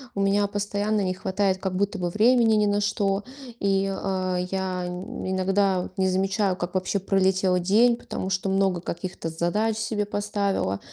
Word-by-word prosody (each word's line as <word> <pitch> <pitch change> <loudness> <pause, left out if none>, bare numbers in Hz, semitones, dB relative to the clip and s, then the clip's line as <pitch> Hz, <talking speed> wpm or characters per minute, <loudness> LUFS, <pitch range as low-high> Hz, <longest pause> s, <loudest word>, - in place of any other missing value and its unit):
у 200 - -1
меня 200 +1 +2
постоянно 205 +1 -1
не 185 -1 0
хватает 190 +1 0
как 190 -1 -3
будто 200 +2 0
бы 175 - -1
времени 225 +2 +4
ни 210 -1 +3
на 205 0 +1
что. 200 -1 0 0.3
И, 195 -1 +2
э, 185 -2 -2
я 185 -1 -2
иногда 190 +1 -1
не 190 0 +2
замечаю, 190 +1 +1
как 175 0 -5
вообще 185 +2 0
пролетел 190 -1 +2
день, 225 +7 +4
потому 190 - -5
что 190 +1 -1
много 195 -2 +1
каких-то 180 0 -5
задач 175 +7 0
себе 220 -2 -1
поставила. 200 - -1
195 Hz, 160 wpm, -25 LUFS, 185-205 Hz, 0.3 s, времени